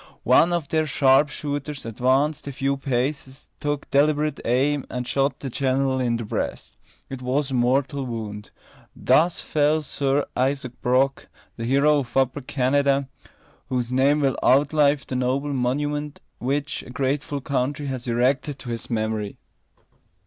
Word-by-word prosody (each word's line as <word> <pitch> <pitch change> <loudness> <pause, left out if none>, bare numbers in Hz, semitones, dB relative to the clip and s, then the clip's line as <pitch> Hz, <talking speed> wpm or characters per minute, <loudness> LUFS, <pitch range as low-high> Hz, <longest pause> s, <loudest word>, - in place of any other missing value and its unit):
One 145 +8 +5
of 170 -4 -1
their 155 -1 +1
sharp 135 +1 +4
shooters 145 -1 -4
advanced 130 +7 +1
a - - -3
few 135 +1 -1
paces, 135 0 -3
took 145 0 -2
deliberate 150 +1 +2
aim, 135 +4 +1
and 125 -1 -4
shot 140 +1 0
the 135 - -4
general 130 +1 0
in 120 -2 +1
the 115 - -5
breast. - - -4 0.3
It 135 -1 -7
was 135 +2 -1
a - - -2
mortal 135 +3 +1
wound. 105 -3 -6 0.5
Thus 170 +2 +3
fell 150 +1 +1
Sir 140 0 0
Isaac 130 0 0
Brock, 130 +2 +1 0.3
the 115 - -5
hero 140 +4 +4
of 130 -1 -5
Upper 135 +2 +1
Canada, 140 +1 +1 0.6
whose 125 -2 -1
name 140 +3 +3
will 135 -2 +1
outlive 145 +1 +3
the 130 - -5
noble 130 +3 0
monument 145 +3 -2 0.2
which 140 +4 -2
a - - -13
grateful 140 +3 -2
country 140 +2 -2
has 130 -3 -4
erected 130 +4 +1
to 130 - -9
his 115 - -5
memory. 110 -2 -2
135 Hz, 150 wpm, -24 LUFS, 125-145 Hz, 0.6 s, One